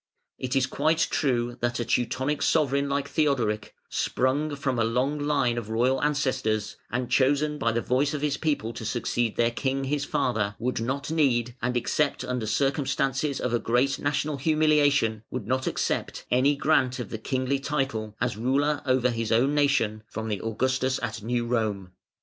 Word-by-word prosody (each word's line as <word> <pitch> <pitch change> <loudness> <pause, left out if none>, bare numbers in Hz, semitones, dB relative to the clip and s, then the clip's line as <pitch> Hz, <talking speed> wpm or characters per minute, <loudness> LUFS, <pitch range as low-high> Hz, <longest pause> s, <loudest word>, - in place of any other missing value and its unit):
It 130 +1 -2
is 135 -1 +3
quite 155 +4 +1
true 120 -4 0
that 120 0 0
a 120 - -1
Teutonic 130 +5 0
sovereign 140 -3 +2
like 140 0 -1
Theodoric, 125 -10 0
sprung 145 +4 0
from 135 -4 -1
a - - +3
long 125 +6 0
line 140 -5 +1
of 110 -2 -8
royal 125 +4 +1
ancestors, 130 -8 0
and 125 +1 -2
chosen 145 +3 +2
by 115 - +1
the 115 +1 -1
voice 140 +4 +1
of 145 - -4
his 150 -2 +1
people 145 -8 -1
to - - -7
succeed 120 0 -1
their 120 0 +2
king, 135 +3 -1
his 145 +1 -1
father, 120 -9 0
would 120 0 -2
not 135 +5 -2
need, 125 -7 +1
and 125 0 0
except 140 +3 0
under 125 -3 -3
circumstances 135 +2 0
of 120 -2 -1
great 125 +4 +2
national 145 +1 -1
humiliation 145 -6 +3
would 125 -5 -4
not 130 +3 -1
accept, - - -2
any 135 +4 +4
grant 135 -3 +2
of 125 -5 -6
the 110 - -4
kingly 130 +3 -1
title, 135 -7 -2
as 120 -2 0
ruler 140 +6 +1
over 130 -1 +3
his 115 -1 -3
own 125 +6 +3
nation, 140 -7 +2
from 110 0 -5
the 105 -3 -2
Augustus 130 +3 0
at 110 -2 -3
New 120 +2 -1
Rome. 110 -6 -1
130 Hz, 175 wpm, -26 LUFS, 115-140 Hz, -, any